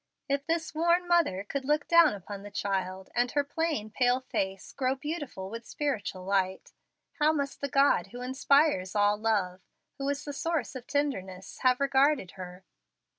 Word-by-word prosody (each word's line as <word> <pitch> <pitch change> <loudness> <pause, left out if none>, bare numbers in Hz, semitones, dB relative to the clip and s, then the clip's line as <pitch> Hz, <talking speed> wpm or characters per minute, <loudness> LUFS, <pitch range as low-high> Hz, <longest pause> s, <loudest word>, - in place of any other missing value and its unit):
If 280 0 -1
this 330 -1 -1
worn 340 +3 +2
mother 335 - +2
could 270 +6 -4
look 295 +2 +1
down 335 -7 +6
upon 200 +1 -8
the 205 - -9
child, 190 -2 -3
and 245 +1 +1
her 290 - +2
plain, 290 -7 -2
pale 250 +2 +2
face 195 -6 -3
grow 260 -1 0
beautiful 285 - -5
with 230 +1 -7
spiritual 205 -10 -3
light, 190 -1 -1 0.5
how 305 +1 +5
must 280 -3 -3
the 280 - -2
God 275 +2 +3
who 245 0 -8
inspires 260 -6 +2
all 205 0 +4
love 205 -4 0 0.4
who 275 0 -1
is 285 0 -3
the 290 - -5
source 325 -3 -2
of 255 -3 -8
tenderness 195 -11 -3
have 255 -1 +3
regarded 275 -6 +2
her? 180 0 -10
255 Hz, 170 wpm, -29 LUFS, 195-290 Hz, 0.5 s, down